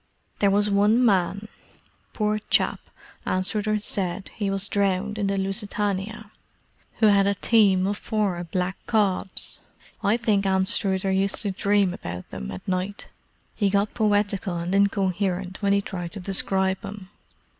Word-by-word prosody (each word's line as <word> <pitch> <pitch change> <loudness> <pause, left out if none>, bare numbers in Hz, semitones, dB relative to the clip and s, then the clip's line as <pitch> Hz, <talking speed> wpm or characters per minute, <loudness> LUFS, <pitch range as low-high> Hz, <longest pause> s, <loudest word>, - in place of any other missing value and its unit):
There 200 - +4
was 205 +1 +2
one 210 +4 +3
man—poor 210 +2 -2
chap, - - +2 0.4
Anstruther 210 +3 0
said 195 -2 -2
he 205 -3 -2
was 195 0 -1
drowned 200 +1 0
in 200 - 0
the 195 0 0
Lusitania—who 205 +2 -4
had 200 -2 +5
a 200 - +1
team 200 -4 +3
of 200 +1 -2
four 205 -6 -1
black 180 +2 -2
cobs. 200 -4 -1 0.4
I 210 +3 +3
think 215 -4 +1
Anstruther 190 0 +2
used 195 +1 +1
to 200 - -1
dream 200 -1 +1
about 90 - -7
them 65 0 -6
at 90 - -8
night; 185 +2 -3 0.4
he 205 -2 +1
got 200 +1 +1
poetical 205 -4 0
and 170 +2 -3
incoherent 195 -2 0
when 200 -1 +2
he 200 0 +3
tried 175 -4 -6
to 205 - -6
describe 190 0 0
'em." 200 -1 -8
200 Hz, 140 wpm, -24 LUFS, 190-210 Hz, 0.4 s, had